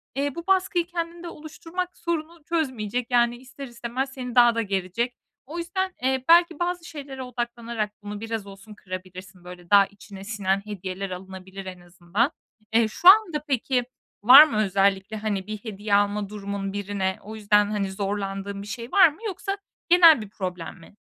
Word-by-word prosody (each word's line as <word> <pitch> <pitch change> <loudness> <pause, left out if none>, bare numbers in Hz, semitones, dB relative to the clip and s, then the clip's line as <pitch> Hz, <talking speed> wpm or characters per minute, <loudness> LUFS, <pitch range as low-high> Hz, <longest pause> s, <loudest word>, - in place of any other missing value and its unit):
eee, 280 0 -1
bu 340 +2 -7
baskıyı 370 -2 +2
kendinde 340 0 -5
oluşturmak 330 +4 -6
sorunu 335 -1 -4
çözmeyecek. 250 -8 -1
Yani 240 0 +3
ister 265 +2 -10
istemez 245 +3 -4
seni 250 -2 -6
daha 240 -1 +6
da 230 - +1
gerecek. 200 +5 -2 0.3
O 320 +5 -8
yüzden, 370 +2 -2
eee, 260 0 +1
belki 340 -1 +5
bazı 350 -1 -2
şeylere 275 -5 -8
odaklanarak 235 -3 -4
bunu 205 0 -6
biraz 225 -3 -4
olsun 195 +2 -12
kırabilirsin. 185 -1 -9
Böyle 180 -1 -12
daha 200 -1 +7
içine 200 -1 -12
sinen 195 -2 -1
hediyeler 195 -1 -5
alınabilir 190 +1 -9
en 185 -1 -8
azından. 180 - -1 0.4
Eee, 225 -1 +4
şu 350 +11 -1
anda 370 -8 +5
peki 255 -1 0 0.4
var 265 +6 +11
mı 290 -8 -1
özellikle, 195 +2 +1
hani, 210 -2 -3
bir 215 0 -4
hediye 205 -1 -2
alma 205 0 +1
durumun 200 -1 -5
birine? 200 -2 -2
O 220 +1 -8
yüzden, 210 -1 +2
hani, 200 -2 -1
zorlandığın 200 0 -4
bir 205 - -9
şey 230 +4 -7
var 375 -2 +7
mı 300 - -15
yoksa 390 +1 -4 0.3
genel 335 -7 +7
bir 210 - -8
problem 180 -3 -6
mi? 165 - -17
220 Hz, 170 wpm, -25 LUFS, 195-285 Hz, 0.4 s, var